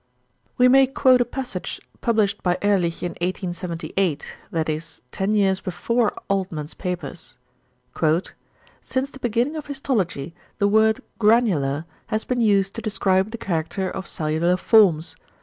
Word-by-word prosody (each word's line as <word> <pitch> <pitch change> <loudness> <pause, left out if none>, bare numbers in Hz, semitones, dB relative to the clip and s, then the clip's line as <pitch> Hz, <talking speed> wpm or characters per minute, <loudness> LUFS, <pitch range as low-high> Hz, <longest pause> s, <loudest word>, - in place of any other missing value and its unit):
We 250 -1 +6
may 270 +1 +6
quote 260 -1 +4
a - - +3
passage 245 -6 -5 0.2
published 215 -3 +1
by 180 -1 +1
Ehrlich 185 -5 +1
in 175 - -1
1878, 175 -2 -2
that 160 -2 -1
is, 160 +1 -4
ten 195 +2 -1
years 195 -2 +3
before 225 +5 0
Altmann's 180 -6 -2
papers. 175 -6 -5 1.4
"Since 265 +1 -2
the 270 - -12
beginning 240 +6 0
of 300 - -6
histology 210 - -2 0.2
the 200 - +2
word 220 +1 +3 0.2
'granular' 185 - +3 0.2
has 220 -1 -1
been 250 -1 0
used 200 -3 +3
to 230 - -6
describe 195 -2 +1
the 230 - -6
character 180 0 -2
of 190 -2 -6
cellular 160 +3 0
forms. 185 -6 +4
195 Hz, 135 wpm, -23 LUFS, 175-230 Hz, 1.4 s, We